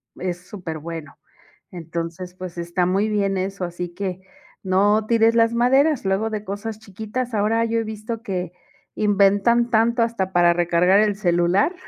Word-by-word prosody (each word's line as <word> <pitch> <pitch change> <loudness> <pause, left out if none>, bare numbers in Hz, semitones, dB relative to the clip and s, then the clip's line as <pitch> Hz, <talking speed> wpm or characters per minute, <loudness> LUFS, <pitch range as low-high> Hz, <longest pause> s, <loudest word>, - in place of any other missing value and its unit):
es 180 0 -5
superbueno. 165 -5 -7 0.5
Entonces, 170 +1 -6
pues 180 -1 -8
está 170 +1 -1
muy 195 +4 +1
bien 200 -2 0
eso, 190 0 -3
así 175 0 -5
que 185 0 -5 0.4
no 205 +3 +2
tires 230 0 +3
las 230 0 +3
maderas. 265 +4 +3
Luego 195 +3 0
de 215 -1 -4
cosas 210 +2 -5
chiquitas. 220 +5 -5
Ahora 220 +2 +2
yo 230 0 0
he 225 - -1
visto 220 +1 -6
que 180 -6 -4 0.4
inventan 205 +3 +3
tanto, 230 +1 +3
hasta 225 -5 -1
para 175 -1 +5
recargar 175 +2 +3
el 210 -1 +2
celular. 180 - +2
200 Hz, 150 wpm, -22 LUFS, 180-225 Hz, 0.5 s, para